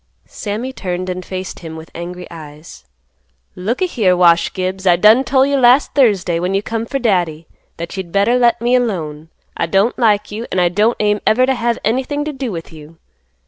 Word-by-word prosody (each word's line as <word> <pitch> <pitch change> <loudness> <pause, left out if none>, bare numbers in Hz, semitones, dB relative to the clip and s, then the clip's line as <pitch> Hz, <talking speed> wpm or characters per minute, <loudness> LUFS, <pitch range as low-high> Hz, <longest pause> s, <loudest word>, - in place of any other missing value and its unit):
Sammy 225 +5 -5
turned 185 -4 -4
and 180 0 -5
faced 185 0 -6
him 160 -2 -8
with 160 0 -11
angry 180 +1 -7
eyes; 155 - -12 0.7
"Look 220 - -2
a - - +4
here, 205 - +1
Wash 170 -1 +4
Gibbs, 190 0 -3
I 175 - +6
done 215 +8 +5
tol' 265 0 +3
you 280 0 +1
last 255 +2 +4
Thursday 200 -11 +2
when 180 +3 -1
you 200 - 0
come 225 +1 -3
for 275 - -2
Daddy 175 - 0 0.3
that 170 +2 -6
you'd 190 -3 -6
better 205 +6 +2
let 235 -1 +3
me 240 +2 0
alone. 165 -11 -1 0.3
I - - -1
don't 195 +5 +1
like 210 -4 +2
you, 225 +3 -5
and 185 - 0
I 175 -1 +3
don't 210 +6 +1
aim 210 0 +1
to - - 0
ever 255 +4 +3
have 235 -2 -1
anything 265 +6 -1
to 305 - -4
do 265 -4 -4
with 165 -2 -7
you. 155 +1 -13
200 Hz, 205 wpm, -17 LUFS, 175-240 Hz, 0.7 s, I